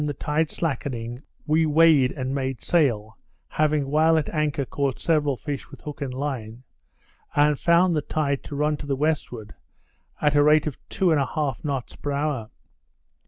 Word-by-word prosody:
the 150 -1 -1
tide 150 +3 0
slackening, 125 -6 -3 0.2
we 155 +1 +3
weighed 155 -4 +5
and 130 -2 -3
made 135 -3 -2
sail 115 -10 +1 0.3
(having 150 -2 +1
while 160 +3 +3
at 155 - 0
anchor 150 -3 -1
caught 140 0 -2
several 150 -4 +1
fish 140 +2 -6
with - - -13
hook 150 0 -8
and 135 -2 -3
line), 125 -4 -5 0.7
and 145 -1 +3
found 170 +1 +4
the 150 - +1
tide 145 -2 -1
to 145 - -7
run 150 +1 +1
to 145 - -8
the 140 - 0
westward, 130 -7 -2 0.7
at 150 -1 +2
the 145 - +5
rate 150 +1 +5
of 150 -4 -3
two 185 -3 +1
and 150 -3 +3
a 135 - 0
half 150 -3 -2
knots 140 -5 -3
per 145 - -4
hour. 140 -6 -2
145 Hz, 175 wpm, -24 LUFS, 135-155 Hz, 0.7 s, weighed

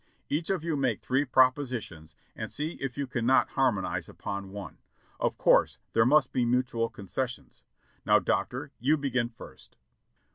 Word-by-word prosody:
Each 155 +3 -1
of 190 -5 0
you 165 -2 -1
make 130 -6 0
three 135 +3 0
propositions 125 - +1 0.2
and - - -5
see 150 +3 -2
if 135 -1 -4
you 140 - -1
cannot 125 0 +2
har 135 -2 +3
monize 95 -4 -3
upon 100 -1 -6
one. 100 0 -8 0.4
Of - - 0
course - - +4 0.2
there 115 +1 +4
must 150 +1 +4
be 125 - +1
mutual 120 -1 +1
concessions. 115 +5 -5 0.4
Now, - - +5
Doctor, - - -1
you 145 +6 +3
begin 130 -4 -1
first." 115 - -14
125 Hz, 155 wpm, -28 LUFS, 115-140 Hz, 0.4 s, Now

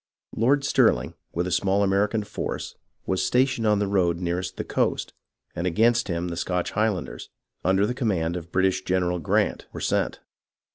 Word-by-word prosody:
Lord 140 +5 +3
Stirling - - +2 0.2
with 85 +1 -1
a 90 - -3
small 95 +3 +2
American 100 +2 +1
force - - -5 0.3
was 95 0 0
stationed 125 +3 +2
on 105 -1 +4
the 105 - +1
road 90 -4 +1
nearest 90 +1 -3
the - - -2
coast, - - -1 0.4
and 85 +2 -1
against 115 +7 +3
him 85 -1 -2
the 85 - -4
Scotch 90 0 -1
Highlanders, 100 - -2 0.3
under 95 +2 +3
the 125 - -1
command 95 -10 0
of 85 -2 -5
the - - -27
British 95 +1 +1
General 90 -1 0
Grant, 75 - 0
were - - -7
sent. - - 0
95 Hz, 175 wpm, -25 LUFS, 90-105 Hz, 0.4 s, on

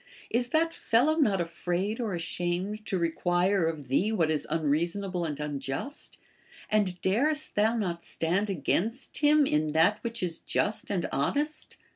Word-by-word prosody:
is 240 +1 +1
that 325 +4 +2
fellow 265 +6 +2
not 210 - +3
afraid 175 +5 -2
or 220 -6 -1
ashamed 175 +5 -2
to 190 - 0
require 175 +2 +1
of 155 -4 -4
thee 185 - +2
what 165 -7 +2
is 155 - -1
unreasonable 170 +4 0
and 150 -3 -4
unjust, 145 - -5 0.5
and 200 -4 +1
darest 295 +11 +1
thou 220 +3 +2
not 175 -6 -2
stand 185 +6 0
against 200 - -1
him 295 0 +5
in 150 - +1
that 165 +6 +3
which 235 -2 -3
is 170 -2 -2
just 210 - -1
and 190 -4 0
honest? 295 - -1
190 Hz, 150 wpm, -28 LUFS, 165-225 Hz, 0.5 s, him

